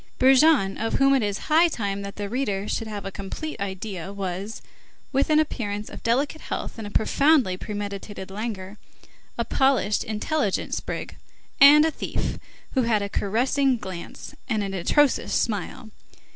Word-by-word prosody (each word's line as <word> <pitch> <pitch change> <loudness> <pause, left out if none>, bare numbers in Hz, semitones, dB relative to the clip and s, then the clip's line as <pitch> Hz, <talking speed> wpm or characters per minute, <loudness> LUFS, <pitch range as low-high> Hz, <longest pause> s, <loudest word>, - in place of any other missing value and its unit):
Brujon, 265 -6 +5
of 225 - -1
whom 275 0 +4
it 270 - +3
is 205 -1 -1
high 325 +3 +5
time 200 -9 -3
that 200 0 -7
the 205 -1 -4
reader 205 -4 -2
should 225 - -2
have 205 -2 -6
a 195 - -4
complete 200 +9 -6
idea, 190 -2 -5
was, 195 +2 -4 0.5
with 275 +2 +1
an 305 - +4
appearance 210 -9 -2
of - - -9
delicate 280 +7 0
health - - -5
and 215 - -5
a - - -6
profoundly 265 -1 +3
premeditated 200 -1 -6
languor, 205 -1 -5 0.6
a 235 - -1
polished, 265 -5 +2
intelligent 220 +1 -1
sprig, - - -4 0.4
and 295 +2 +9
a 320 - +1
thief, - - -3 0.3
who 265 - +2
had 225 -4 +1
a 200 - -3
caressing 255 +7 +1
glance, 185 -5 -8 0.2
and 215 -3 0
an 195 -1 -4
atrocious 270 - +2
smile. 220 +2 -2
215 Hz, 160 wpm, -25 LUFS, 200-270 Hz, 0.6 s, and